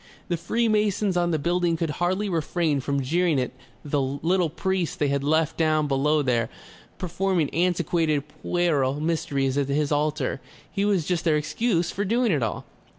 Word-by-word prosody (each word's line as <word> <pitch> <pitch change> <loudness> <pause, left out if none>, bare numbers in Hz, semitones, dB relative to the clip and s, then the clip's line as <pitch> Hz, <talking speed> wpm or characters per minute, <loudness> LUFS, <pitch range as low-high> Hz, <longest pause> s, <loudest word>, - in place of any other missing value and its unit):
The 175 - +1
Freemasons 210 0 +1
on 175 -1 +2
the 160 - +1
building 170 +2 +1
could 160 -2 -1
hardly 185 +4 +1
refrain 165 -3 0
from 140 +1 -1
jeering 165 +1 +2
at 125 - -2 0.3
the 145 -1 0
little 160 +6 0
priest 185 +1 -2
they 145 - +1
had 140 0 0
left 155 +1 +1
down 155 -2 +2
below 145 +2 +2
there, 120 -3 +1 0.5
performing 180 -3 0
antiquated 165 -4 +1
puerile 150 -3 0
mysteries 145 -4 0
at 140 -1 -1
his 145 +1 0
altar. 150 0 0 0.3
He 200 - 0
was 195 -6 +1
just 175 -1 -1
their 160 -3 +3
excuse 175 +3 0
for 200 - -2
doing 230 +3 +2
it 150 -5 +1
all." 110 - -2
160 Hz, 165 wpm, -25 LUFS, 145-180 Hz, 0.5 s, their